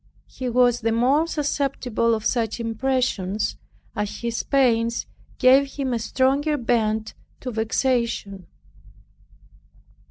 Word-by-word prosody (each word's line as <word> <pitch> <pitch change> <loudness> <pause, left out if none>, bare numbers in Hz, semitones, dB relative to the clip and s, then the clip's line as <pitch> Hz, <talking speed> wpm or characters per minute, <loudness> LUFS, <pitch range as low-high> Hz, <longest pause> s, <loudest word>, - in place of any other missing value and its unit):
He 255 -2 -5
was 245 0 +3
the 225 0 +1
more 265 +8 +2
susceptible 275 -6 0
of 220 - -6
such 230 -2 0
impressions, 230 -4 -1 0.4
as 210 0 -4
his 235 -1 -2
pains 235 -4 +1 0.3
gave 270 +2 +4
him 270 -3 -2
a 235 - 0
stronger 275 +6 +1
bent 220 -3 0 0.3
to 255 - -4
vexation. 225 -4 -1
240 Hz, 105 wpm, -23 LUFS, 225-265 Hz, 0.4 s, gave